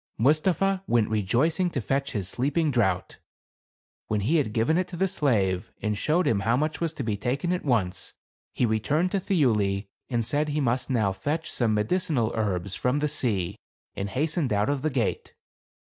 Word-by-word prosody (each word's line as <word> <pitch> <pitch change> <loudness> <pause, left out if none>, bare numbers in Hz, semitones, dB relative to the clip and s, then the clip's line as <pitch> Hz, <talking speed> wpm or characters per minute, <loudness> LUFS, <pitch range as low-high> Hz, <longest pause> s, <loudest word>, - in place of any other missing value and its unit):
Mustapha 180 +9 +2
went 115 -3 +2
rejoicing 130 - +1
to 150 - -3
fetch 135 +5 -1
his 100 -6 -2
sleeping 145 - 0
draught. 95 -8 0 0.9
When 105 -1 0
he 145 +12 +2
had 135 -8 0
given 120 +10 +2
it 185 - -1
to 175 - -8
the 190 +2 +2
slave, 100 - 0
and 105 -1 -1
showed 155 - +1
him 110 - +2
how 115 +5 +1
much 155 +4 -1
was 165 -2 0
to 140 - -4
be 110 -3 -1
taken 135 - -1
at 180 - -2
once, 105 - -1 0.4
he 125 - +1
returned 145 - +1
to 200 - +1
Thiuli, 105 - +1 0.2
and 120 -3 0
said 150 +5 0
he 150 +1 -1
must 125 -2 0
now 110 -7 +1
fetch 150 +11 -3
some 115 -4 +1
medicinal 120 - +1
herbs 100 -4 -1
from 125 +6 0
the 150 +1 +1
sea, 100 -8 -1 0.4
and 100 +1 -4
hastened 150 - 0
out 105 +2 +1
of 145 -2 0
the 155 - +1
gate. 125 -7 -2
125 Hz, 185 wpm, -26 LUFS, 105-155 Hz, 0.9 s, Mustapha